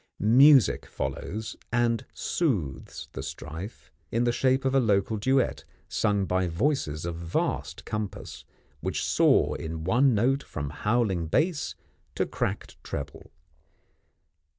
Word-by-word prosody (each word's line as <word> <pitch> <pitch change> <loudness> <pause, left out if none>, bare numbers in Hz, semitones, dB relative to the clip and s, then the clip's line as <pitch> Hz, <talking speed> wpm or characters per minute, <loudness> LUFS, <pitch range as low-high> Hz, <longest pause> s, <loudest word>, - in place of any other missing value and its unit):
Music 130 - +6
follows, 105 +11 -4 0.2
and 115 -1 +1
soothes 85 - -2
the - - -6
strife, 90 +9 -8 0.2
in 115 +2 +1
the 120 - +3
shape 130 +2 +1
of 135 - +2
a 135 - +5
local 105 -2 +2
duet, 130 +4 +1 0.2
sung 100 -3 +1
by 95 0 +1
voices 85 - -1
of 85 -1 -3
vast 85 0 -2
compass, 105 -2 -5 0.4
which - - -2
soar - - +3
in 80 0 -5
one 125 +8 +3
note 130 +6 +2
from 70 -1 -5
howling 105 -3 0
bass 155 - 0 0.4
to - - +1
cracked - - -4
treble. 70 - -6
110 Hz, 125 wpm, -27 LUFS, 85-130 Hz, 0.4 s, Music